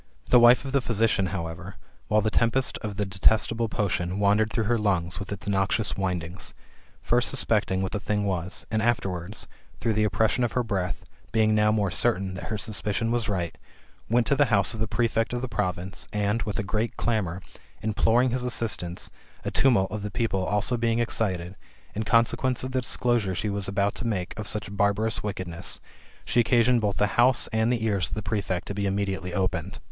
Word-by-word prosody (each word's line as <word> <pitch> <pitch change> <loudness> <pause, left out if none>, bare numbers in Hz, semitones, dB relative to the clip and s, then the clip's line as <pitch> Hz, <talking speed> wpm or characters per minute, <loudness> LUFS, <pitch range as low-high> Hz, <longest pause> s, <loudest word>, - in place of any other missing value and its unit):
The 125 - +8
wife 120 +2 +6
of 135 - -4
the 140 0 +2
physician, 110 -4 +1
however, 90 0 -5 0.3
while 105 0 +3
the 110 +1 0
tempest 115 +4 +1
of 105 -3 -5
the 105 - 0
detestable 110 +4 +2
potion 90 -3 -1
wandered 105 +2 +2
through 115 - 0
her 115 +2 +1
lungs 90 -4 0
with 100 - -7
its 100 -1 -6
noxious 100 +2 +1
windings, 90 -1 -3 0.5
fir>t - - +2
suspecting 95 0 +2
what 95 - -3
the 105 - -2
thing 105 0 -1
was, 90 -2 -3
and 110 0 +1
afterwards, 100 -4 -2 0.3
through 115 - 0
the 105 0 +2
oppression 110 +4 +1
of 120 - -1
her 125 - +1
breath, 95 -5 -3 0.3
being 110 -1 +3
now 105 0 +4
more 105 -3 +1
certain 95 +2 +1
[that 95 - -6
her 110 - -3
suspicion 110 +1 -1
was 120 -3 0
right], 90 -4 -2 0.5
went 120 +1 +3
to 140 - +2
the 145 +1 +4
house 100 -4 +2
of 110 - -7
the 110 - 0
prefect 115 +1 0
of 120 +1 -2
the - - -1
province, 95 -3 -2
and, 105 +2 0
with 105 -1 -3
a 110 - -1
great 110 +4 -2
clamour, 95 -7 -1 0.4
imploring 110 +3 +2
his 125 0 -1
assistance, 110 -8 -1 0.3
a - - -1
tumult 115 -8 +3
of 105 - -4
the 105 - -4
people 95 -1 -1
also 105 +6 +1
being 115 -1 +1
excited, 95 -6 -1 0.4
in 110 - -3
consequence 115 +4 +2
of 130 - -4
the 130 0 0
disclosure 120 -5 0
she 105 +4 -1
was 100 -1 -2
about 100 +1 0
to 120 - -3
make 95 -5 -2
of 105 - -4
such 105 -2 -3
barbarous 100 +2 +1
wickedness, 90 -4 -3 0.5
she 120 - +1
occasioned 120 0 +4
both 105 -2 -1
the 105 +3 +2
house 130 +1 +4
and 110 +2 +2
the 115 -2 0
ears 100 -5 0
of - - -4
the 110 - -4
prefect 95 -3 -2
to - - -3
be 100 0 -1
immediately 95 -2 -2
opened. 90 -1 -2
105 Hz, 200 wpm, -26 LUFS, 95-115 Hz, 0.5 s, The